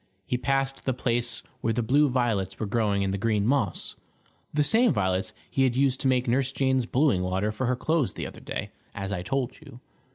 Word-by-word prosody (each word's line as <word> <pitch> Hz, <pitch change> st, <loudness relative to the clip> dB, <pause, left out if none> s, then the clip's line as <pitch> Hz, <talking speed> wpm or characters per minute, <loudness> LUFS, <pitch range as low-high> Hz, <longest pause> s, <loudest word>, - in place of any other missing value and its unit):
He 125 Hz, -, -1 dB
passed 135 Hz, +2 st, -1 dB
the 130 Hz, -, 0 dB
place 120 Hz, -1 st, -1 dB, 0.2 s
where 115 Hz, -, 0 dB
the 120 Hz, +1 st, 0 dB
blue 145 Hz, +6 st, +4 dB
violets 115 Hz, -7 st, 0 dB
were 110 Hz, -, -1 dB
growing 100 Hz, -2 st, +1 dB
in 95 Hz, -, 0 dB
the 100 Hz, -, -2 dB
green 105 Hz, -1 st, +1 dB
moss 115 Hz, -7 st, 0 dB, 0.6 s
the 150 Hz, 0 st, +2 dB
same 225 Hz, -, +5 dB
violets 95 Hz, -1 st, 0 dB, 0.2 s
he 135 Hz, -, -1 dB
had 130 Hz, -2 st, +3 dB
used 135 Hz, -1 st, +2 dB
to -, -, +2 dB
make 125 Hz, 0 st, +2 dB
Nurse 130 Hz, +2 st, +1 dB
Jane's 130 Hz, -3 st, +1 dB
blueing 130 Hz, -8 st, +2 dB
water 95 Hz, +3 st, 0 dB
for 120 Hz, +4 st, -2 dB
her 125 Hz, -, +2 dB
clothes 155 Hz, +1 st, 0 dB
the -, -, -5 dB
other -, -, -8 dB
day, -, -, -5 dB, 0.2 s
as 100 Hz, 0 st, -4 dB
I 90 Hz, -3 st, -2 dB
told 125 Hz, +6 st, -2 dB
you. 140 Hz, -5 st, -13 dB
125 Hz, 215 wpm, -27 LUFS, 105-135 Hz, 0.6 s, same